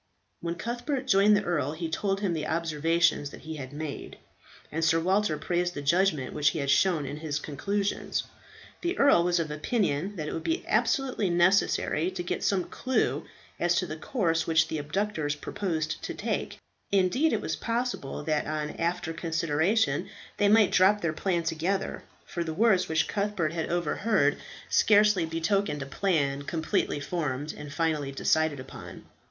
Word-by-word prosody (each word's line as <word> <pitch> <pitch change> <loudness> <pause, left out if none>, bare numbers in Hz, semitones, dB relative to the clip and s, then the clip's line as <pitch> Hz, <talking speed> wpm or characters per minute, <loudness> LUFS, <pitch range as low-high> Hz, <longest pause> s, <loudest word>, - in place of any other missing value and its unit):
When 170 0 -3
Cuthbert 245 - -3
joined 205 -2 +5
the 205 - -1
earl 150 -6 -1
he 165 +1 -4
told 195 +5 -1
him 195 -4 0
the 155 -2 -2
observations 165 -1 +1
that - - -12
he 160 0 -7
had 130 -2 -7
made, 150 0 -6 0.5
and 160 +2 -2
Sir 165 0 +4
Walter 185 -1 +1
praised 175 +1 -1
the 145 - -5
judgment 160 -3 +2
which 150 0 +3
he - - -4
had 140 -2 0
shown 170 -5 +3
in 145 +2 -5
his 155 -2 -3
conclusions. 200 +8 -2 0.6
The 350 +2 -1
earl 280 -11 +5
was 175 0 +2
of 160 -2 -2
opinion 185 +2 -1
that 155 -4 -4
it - - -4
would 165 - -4
be 330 +2 -1
absolutely 260 -8 +1
necessary 175 -1 +2
to 185 -1 -5
get 175 - -3
some 190 -3 +2
clue 255 +6 -1 0.3
as 175 0 +2
to 180 - +1
the 155 - -5
course 165 - -1
which 160 -1 +3
the 160 - -2
abductors 155 -1 -1
purposed 155 0 -3
to - - -5
take; - - -3 0.3
indeed 200 - +3
it - - +1
was - - -3
possible 235 - -3
that 155 -1 0
on 150 0 -2
after 170 -1 -1
consideration 165 +5 0 0.3
they 205 - +3
might 215 -1 +5
drop 200 +3 +4
their 165 -2 0
plan 175 +1 0
altogether, 165 +4 -2 0.2
for 170 - -3
the 160 -1 -4
words 200 -3 +3
which 160 0 +1
Cuthbert 200 -6 -1
had 165 -1 -2
overheard 175 -1 +1 0.3
scarcely 210 -5 +4
betokened 165 -2 0
a - - -7
plan 140 -3 0
completely 155 0 -1
formed 145 -2 -3
and 150 -1 -8
finally 150 -2 -1
decided 155 +1 +1
upon. 130 - -10
170 Hz, 170 wpm, -28 LUFS, 155-195 Hz, 0.6 s, joined